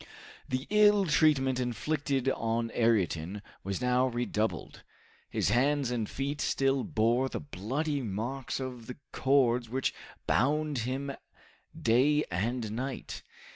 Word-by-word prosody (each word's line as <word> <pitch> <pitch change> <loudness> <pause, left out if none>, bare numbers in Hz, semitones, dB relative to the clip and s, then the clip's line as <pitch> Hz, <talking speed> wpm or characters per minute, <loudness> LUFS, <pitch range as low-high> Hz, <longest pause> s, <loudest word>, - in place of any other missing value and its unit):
The 130 +2 -2
ill 210 -1 +5
treatment 140 -5 +3
inflicted 135 +2 -1
on 115 -2 -1
Ayrton 100 - +1 0.2
was 100 +4 -3
now 125 +1 +3
redoubled. 110 - -2 0.5
His - - 0
hands 135 +3 +2
and 115 -3 -2
feet 140 +1 -3
still 135 -1 +1
bore 120 +4 +1
the - - -4
bloody 145 - -3
marks 120 +6 -3
of 125 -3 -6
the 125 - -7
cords 125 -3 +2
which 130 +2 -1 0.3
bound 150 +2 +1
him 140 +2 -3 0.7
day 140 +6 +3
and 110 +5 -1
night. 130 +4 -5
125 Hz, 120 wpm, -30 LUFS, 115-140 Hz, 0.7 s, ill